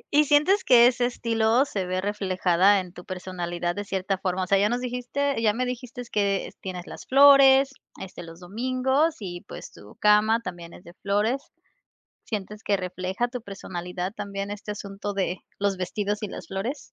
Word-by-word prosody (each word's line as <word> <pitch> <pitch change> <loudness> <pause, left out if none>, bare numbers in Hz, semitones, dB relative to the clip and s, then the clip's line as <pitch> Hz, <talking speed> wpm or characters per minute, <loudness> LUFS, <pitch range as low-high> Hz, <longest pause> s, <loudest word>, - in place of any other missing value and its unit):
¿Y 300 +1 +6
sientes 300 +8 +4
que 240 -2 +7
ese 245 0 +3
estilo 230 +1 +1
se 195 -9 -3
ve 185 0 -1
reflejada 195 -1 +2
en 180 -1 -11
tu 180 - -11
personalidad 175 -2 -4
de 205 - -4
cierta 195 -1 -2
forma? 185 0 -1
O - - -4
sea 195 +1 +3
ya 205 +1 +3
nos 240 +2 0
dijiste 250 +2 -2
ya 215 -2 +3
me 250 +3 -1
dijiste 250 0 -6
que 200 -2 0
tienes 180 -2 -6
las - - -10
flores 275 0 +7 0.3
este 190 - -8
los 165 0 -11
domingos 255 - 0
y 175 -4 -6
pues - - -9
tu 105 - -15
cama 210 +2 +4
también 175 -6 -8
es - - -14
de 170 - -13
flores, 210 +7 +1 0.8
¿sientes 210 0 -5
que 200 - +1
refleja 185 +4 -3
tu 245 -1 -7
personalidad 180 -2 -5
también 200 -1 -5
este 210 +1 -7
asunto 205 0 -5
de 185 -2 -1 0.2
los 200 -1 0
vestidos 205 +3 -3
y 210 - -2
las 175 - -8
flores? 200 - -3
205 Hz, 180 wpm, -25 LUFS, 185-245 Hz, 0.8 s, que